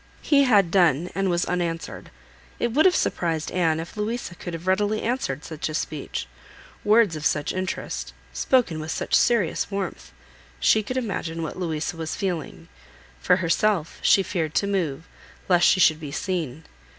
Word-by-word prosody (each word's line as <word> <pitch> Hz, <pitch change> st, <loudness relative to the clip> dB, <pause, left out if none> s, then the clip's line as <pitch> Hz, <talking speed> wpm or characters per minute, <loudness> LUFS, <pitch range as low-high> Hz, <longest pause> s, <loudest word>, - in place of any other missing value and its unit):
He 280 Hz, -2 st, +4 dB
had 200 Hz, -8 st, +4 dB
done, 175 Hz, -3 st, +3 dB
and 195 Hz, 0 st, 0 dB
was 175 Hz, 0 st, +1 dB
unanswered. 170 Hz, -2 st, -3 dB, 0.5 s
It 240 Hz, -, -1 dB
would 305 Hz, +6 st, +4 dB
have 365 Hz, -, +3 dB
surprised 165 Hz, -3 st, -1 dB
Anne 165 Hz, -3 st, +1 dB
if 165 Hz, +1 st, -7 dB
Louisa 215 Hz, -1 st, -3 dB
could 175 Hz, 0 st, -6 dB
have 165 Hz, +2 st, -9 dB
readily 205 Hz, +3 st, +1 dB
answered 220 Hz, -, -2 dB
such 160 Hz, -1 st, -4 dB
a 155 Hz, -, -4 dB
speech: 155 Hz, -2 st, -4 dB, 0.6 s
words 210 Hz, -4 st, +4 dB
of 155 Hz, -, -6 dB
such 145 Hz, 0 st, 0 dB
interest, 185 Hz, -, -4 dB, 0.2 s
spoken 180 Hz, -, +1 dB
with 155 Hz, +1 st, -6 dB
such -, -, -3 dB
serious 230 Hz, -9 st, +2 dB
warmth! 200 Hz, -1 st, -5 dB, 0.5 s
She 220 Hz, -, +4 dB
could 255 Hz, +5 st, -4 dB
imagine 170 Hz, -8 st, -3 dB
what 160 Hz, -, -5 dB
Louisa 165 Hz, -1 st, -2 dB
was 160 Hz, -1 st, -4 dB
feeling. 160 Hz, -, -4 dB, 0.5 s
For 180 Hz, -, +4 dB
herself, 180 Hz, 0 st, 0 dB
she 195 Hz, -, +5 dB
feared 165 Hz, -5 st, -3 dB
to -, -, +2 dB
move, 175 Hz, -6 st, -2 dB, 0.4 s
lest 175 Hz, -2 st, +5 dB
she -, -, +4 dB
should 160 Hz, -3 st, +5 dB
be 150 Hz, -3 st, -7 dB
seen. 160 Hz, -4 st, -3 dB
175 Hz, 165 wpm, -24 LUFS, 160-200 Hz, 0.6 s, she